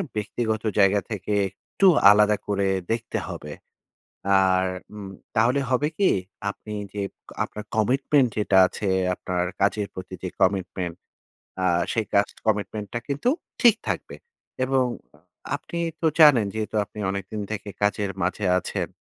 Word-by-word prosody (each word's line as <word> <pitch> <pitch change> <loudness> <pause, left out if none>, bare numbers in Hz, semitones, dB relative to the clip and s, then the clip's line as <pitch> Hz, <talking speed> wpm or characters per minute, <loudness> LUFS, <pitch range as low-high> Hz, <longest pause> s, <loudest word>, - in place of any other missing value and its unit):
ব্যক্তিগত 110 +1 -2 0.2
জায়গা 100 +1 +5
থেকে 105 0 -3 0.2
একটু 100 - 0 0.2
আলাদা 105 0 +5
করে 100 -1 +1 0.2
দেখতে 115 0 -2
হবে। 75 - -7 0.9
আর 95 -1 +3 0.3
উম 100 -2 -7 0.3
তাহলে 120 +5 +3
হবে 130 +3 +2
কি? 200 - +4 0.4
আপনি 105 +1 -8 0.2
যে 105 - -3 0.4
আপনার 105 - -7
কমিটমেন্ট 130 +5 +3
যেটা 100 -2 +2
আছে, 100 - -5 0.3
আপনার 90 -1 -2 0.2
কাজের 100 0 +1
প্রতি 95 0 -8
যে 90 - -2
কমিটমেন্ট 95 -2 0 0.7
আ - - +3 0.3
সেই 115 -2 -1
কাজ 100 0 +5 0.2
কমিটমেন্টটা 105 +1 -1
কিন্তু 145 - -1 0.3
ঠিক 235 -2 +7
থাকবে - - -3 0.5
এবং 130 0 +2 0.7
আপনি 170 - -7 0.2
তো 165 - +1
জানেন 140 -9 +7
যেহেতু 110 0 -3
আপনি 100 - -15
অনেকদিন 100 +2 -4
থেকে 105 -1 -5
কাজের 105 -1 +1
মাঝে 95 +3 -1
আছেন। - - -3
105 Hz, 135 wpm, -24 LUFS, 100-115 Hz, 0.9 s, ঠিক